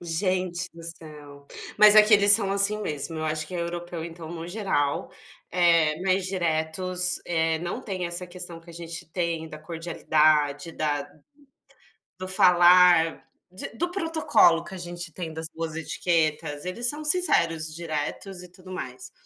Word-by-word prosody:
Gente 180 +1 -2
do 170 - -11
céu, 150 -4 -11 0.3
mas 210 0 +8
aqui 215 +1 +7
eles 205 0 +5
são 205 -2 +2
assim 200 +2 +1
mesmo, 155 -1 -4
eu 155 - -3
acho 155 0 -2
que 185 - -9
europeu 170 -1 -4
então, 165 -1 -9
no 170 0 -7
geral, 175 -8 -1 0.4
eh, 170 -3 +3
mais 190 0 +1
diretos, 180 +1 -2
eh, 160 -1 0
não 175 +8 -4
tem 190 -7 -4
essa 175 +1 -6
questão 175 -1 -9
que 165 - -23
a - - -10
gente 165 0 -8
tem 170 -2 -2
da 155 - -9
cordialidade, 155 -2 +1
da 145 -2 -2 1.1
do 185 - -5
falar, 175 -2 +5 0.2
de 185 +1 -8
do 350 +2 -1
protocolo 325 - +3
que 190 - -9
a - - -7
gente 175 -2 -8
tem 165 -3 -6
das 160 0 -5
boas 165 -1 -5
etiquetas, 160 -2 -1
eles 235 +7 -2
são 295 +3 -6
sinceros, 170 - +1
diretos 170 +3 -5
e 180 - -14
tudo 185 +1 -15
mais. 130 -7 -7
170 Hz, 155 wpm, -26 LUFS, 160-185 Hz, 1.1 s, mas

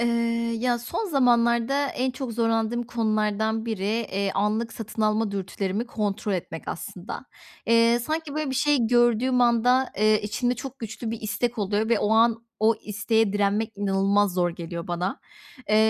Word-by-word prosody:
Eee, 235 - +2 0.5
ya, 245 0 +1
son 335 - -4
zamanlarda 245 0 +3
en 260 -1 -1
çok 255 -2 -5
zorlandığım 225 +1 0
konulardan 220 -1 -1
biri, 215 -4 -3
eee, 205 -3 -1
anlık 215 +3 0
satın 220 0 -5
alma 215 0 +1
dürtülerimi 195 +3 -3
kontrol 210 -3 -2
etmek 165 -3 -4
aslında. 185 +9 -6 0.4
Eee, 230 +1 +4
sanki, 310 +4 -3
böyle, 305 -2 -2
bir - - -3
şey 275 -3 +2
gördüğüm 240 +1 +3
anda, 245 +2 +3
eee, 215 0 +3
içimde 245 +4 -1
çok 265 +2 -8
güçlü 225 0 -5
bir 230 - -5
istek 225 +2 -2
oluyor 205 +2 0
ve 230 -2 +3
o 205 - 0
an, 230 0 +3 0.2
o 220 +1 +4
isteğe 215 0 +1
direnmek 205 +2 0
inanılmaz 200 0 +2
zor 175 -1 +1
geliyor 170 0 -6
bana. 180 - -2 0.5
Eee, 215 - +4
225 Hz, 160 wpm, -25 LUFS, 205-240 Hz, 0.5 s, Eee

